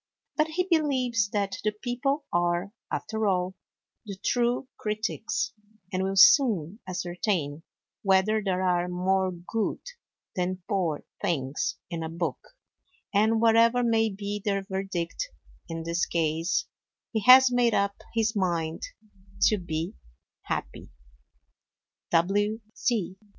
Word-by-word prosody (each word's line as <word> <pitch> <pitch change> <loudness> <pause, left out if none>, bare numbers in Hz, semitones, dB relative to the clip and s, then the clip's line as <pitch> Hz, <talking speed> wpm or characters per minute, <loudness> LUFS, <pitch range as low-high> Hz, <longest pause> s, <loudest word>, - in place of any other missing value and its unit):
But 305 0 +2
he 330 +3 0
believes 260 - +1
that 200 -2 -1
The 215 0 +1
People 265 +6 -2
are, 175 +2 +1 0.2
after 220 -1 -1
all, 185 -1 +1 0.5
the 200 -2 -7
true 245 +1 +1
critics, 215 -2 -2 0.4
and 185 - 0
will 195 +1 -1
soon 200 - +5
ascertain 175 -4 -2 0.4
whether 195 +2 +3
there 190 -1 0
are 180 -1 +2
more 185 +1 +1
good 180 +5 -2 0.6
than 185 -1 -2
poor 180 -8 -1 0.2
things 145 -8 -1 0.2
in 170 -1 -3
a 160 - -3
book; 170 +1 -3 0.7
and 220 +2 +3
whatever 230 +2 +5
may 225 -1 +3
be 205 +1 -4
their 200 -2 0
verdict 190 - -3 0.4
in 165 0 -4
this 170 +1 0
case, 165 +1 0 0.5
he 220 - 0
has 260 0 +9
made 245 -2 +3
up 200 0 0
his 225 0 +1
mind 170 -4 -1 0.6
to 215 - +4
be 165 -2 -3 0.5
happy. - - -5
195 Hz, 115 wpm, -27 LUFS, 175-225 Hz, 0.7 s, has